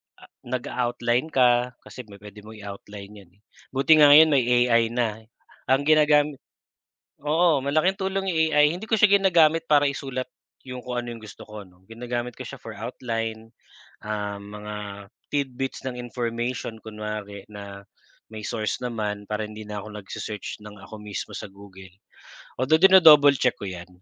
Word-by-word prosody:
Ah, - - -19 0.2
nag-a-outline 120 +1 -1
ka 125 -4 +2
kasi 125 -3 -11
may 100 - -13
puwede 105 +1 -13
mong 110 +1 -12
i-outline 100 0 -10
yan, 95 -3 -18
eh, 100 - -33 0.3
buti 145 +4 +5
nga 150 - +8
ngayon 155 +2 +8
may 130 -4 +2
AI 120 -2 +3
na. 115 -2 -2 0.5
Ang 135 +2 +3
ginagamit 150 -1 +3 0.8
oo, 155 -1 +2
malaking 155 +7 +1
tulong 195 0 -2
yung 160 -3 +1
AI 150 0 +5
hindi 185 - -8
ko 220 0 0
siya 210 - +7
ginagamit 165 -5 +3
para 145 -1 +5
isulat 135 -2 -4 0.4
yung 125 -1 -7
kung 125 -1 -3
ano 120 -1 -6
yung 115 - -13
gusto 105 -4 -12
ko 105 -1 -9
'no. 90 0 -23
Ginagamit 120 +1 -5
ko 130 - -8
siya - - -9
for 115 -2 -9
outline, 115 0 -5 0.4
ah, 105 -1 -4
mga 105 +1 -8 0.5
tidbits 135 -2 -3
ng 125 -2 -5
information 120 -1 -4
kunwari 105 -2 -7
na 100 -1 -9 0.5
may 110 - -7
source 110 -2 -2
naman 105 -4 -4
para 105 0 -3
hindi 105 0 -9
na 105 -1 -6
ako 110 - -10
nag-sesearch 105 +1 -7
ng 105 -1 -12
ako - - -10
mismo 105 -2 -6
sa - - -7
Google. 95 -1 -14 0.7
Although 155 +6 +2
dino-double 155 -7 +8
check 125 - +2
ko 100 - -4
yan. 90 -1 -8
120 Hz, 165 wpm, -24 LUFS, 105-140 Hz, 0.8 s, nga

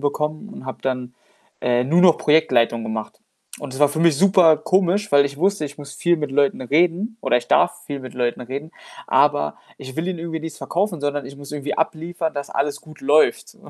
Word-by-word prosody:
bekommen 150 +6 -2
und 215 - -10
habe 130 - -6
dann, 125 -2 -3 0.5
äh, 125 0 +1
nur 165 +7 +3
noch 180 -3 +6
Projektleitung 120 -7 +2
gemacht 110 -1 -5 0.4
und - - -7
das 135 - -7
war 145 - +6
für 155 - -3
mich 165 -3 +4
super 185 -2 +5
komisch, 190 +5 +1
weil 140 0 +6
ich 140 0 -9
wusste, 195 +1 +1
ich 145 +1 -11
muss 145 -1 -9
viel 175 +2 +2
mit 150 -3 -4
Leuten 140 -1 +1
reden 175 - +1
oder - - +2
ich 120 0 -2
darf 175 - +2
viel 140 -2 -5
mit 130 -1 -10
Leuten 120 -1 -1
reden, 135 +5 -6 0.4
aber 75 0 +2 0.2
ich 130 -1 -10
will 160 +2 -2
ihnen 185 -2 -3
irgendwie 165 -1 -5
nichts 160 -1 -7
verkaufen, 180 -3 -2
sondern 145 -2 -2
ich 140 +1 -11
muss 140 0 -11
irgendwie 145 -1 -4
abliefern, 165 +1 -2
dass 140 -1 -5
alles 140 +1 -1
gut 155 -1 -15
läuft. 145 +3 +2
145 Hz, 210 wpm, -21 LUFS, 135-170 Hz, 0.5 s, noch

